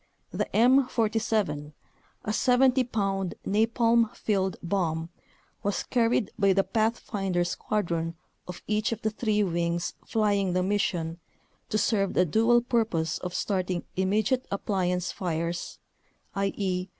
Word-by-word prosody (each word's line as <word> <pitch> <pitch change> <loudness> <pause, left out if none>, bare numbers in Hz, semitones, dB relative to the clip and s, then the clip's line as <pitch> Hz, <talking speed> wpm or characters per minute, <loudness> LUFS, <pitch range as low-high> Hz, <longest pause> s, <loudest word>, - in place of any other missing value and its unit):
The - - -1
M47, 225 - +2 0.5
a 215 - -1
70 255 +2 +4
pound 195 -5 -1
napalm 230 +2 +3
filled 190 -3 0
bomb, 170 -3 -1 0.5
was 200 0 -1
carried 230 -3 +1
by 195 -1 +4
the 195 +1 +3
pathfinder 205 -5 0
squadron 170 -3 -2 0.3
of 180 -1 -8
each 215 +2 0
of 230 +1 -4
the 220 - +1
three 215 -1 +1
wings 170 -1 -1
flying 205 -4 +1
the 180 0 +1
mission 180 -4 -1 0.5
to 215 - +1
serve 200 -2 +1
the 180 - +4
dual 225 +8 +4
purpose 225 -10 0
of 180 -1 -5
starting 185 -3 -1
immediate 210 +7 +1
"appliance" 180 -3 -1
fires 170 -1 -3 0.6
(i.e. 195 -2 -1
200 Hz, 120 wpm, -27 LUFS, 180-225 Hz, 0.6 s, 70